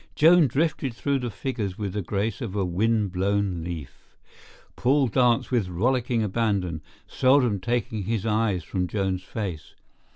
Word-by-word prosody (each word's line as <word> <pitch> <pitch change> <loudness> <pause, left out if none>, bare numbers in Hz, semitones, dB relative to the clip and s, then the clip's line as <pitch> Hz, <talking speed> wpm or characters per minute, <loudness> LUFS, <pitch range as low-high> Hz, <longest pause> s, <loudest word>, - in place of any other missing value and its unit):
Joan 165 0 +6
drifted 135 -2 -1
through 140 +3 0
the 125 -1 -3
figures 105 -3 -4
with 100 -3 -4
the 105 - -2
grace 100 +6 -2
of 110 -5 -4
a 100 -2 +1
wind 105 +3 +1
blown 95 -2 0
leaf. 80 -5 -8 0.6
Paul 135 +2 +3
danced 120 +1 +2
with 115 -7 +1
rollicking 120 +5 +1
abandon, 100 -6 -1 0.3
seldom 130 -6 +3
taking 115 0 -2
his 110 -1 -1
eyes 105 -4 +1
from 90 -1 -2
Joan's 95 -2 -1
face. 90 -7 -6
105 Hz, 150 wpm, -25 LUFS, 95-120 Hz, 0.6 s, Joan